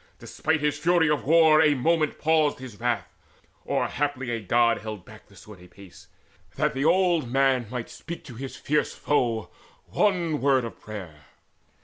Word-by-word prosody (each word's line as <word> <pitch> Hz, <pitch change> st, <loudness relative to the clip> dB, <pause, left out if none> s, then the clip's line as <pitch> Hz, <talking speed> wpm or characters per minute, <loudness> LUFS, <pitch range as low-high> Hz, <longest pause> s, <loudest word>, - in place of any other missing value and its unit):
Despite 160 Hz, -1 st, -2 dB
his 145 Hz, -1 st, 0 dB
fury 165 Hz, -1 st, +3 dB
of 150 Hz, -, -1 dB
war, 160 Hz, 0 st, +5 dB
A 150 Hz, -2 st, +4 dB
moment 155 Hz, +3 st, +1 dB
paused 155 Hz, -2 st, +2 dB
his 125 Hz, -5 st, -11 dB
wrath, 120 Hz, -1 st, -2 dB, 0.5 s
or -, -, 0 dB
haply 140 Hz, -4 st, -2 dB
a 115 Hz, -, -2 dB
God 115 Hz, +3 st, +2 dB
Held 105 Hz, -4 st, -8 dB
back -, -, -15 dB
the -, -, -20 dB
sword 105 Hz, -4 st, -14 dB
a -, -, -14 dB
space, 95 Hz, 0 st, -16 dB, 0.5 s
that -, -, 0 dB
that 135 Hz, -, -2 dB
old 175 Hz, -5 st, +2 dB
man 135 Hz, -2 st, +2 dB
Might 125 Hz, -1 st, -5 dB
speak 170 Hz, +1 st, -8 dB
to 130 Hz, -, -11 dB
his 130 Hz, +2 st, -7 dB
fierce 150 Hz, +5 st, -1 dB
foe 120 Hz, -6 st, -1 dB, 0.3 s
one 175 Hz, -7 st, 0 dB
word 135 Hz, -2 st, +2 dB
of 115 Hz, -, -9 dB
prayer. 90 Hz, -9 st, -9 dB
135 Hz, 170 wpm, -25 LUFS, 115-155 Hz, 0.5 s, war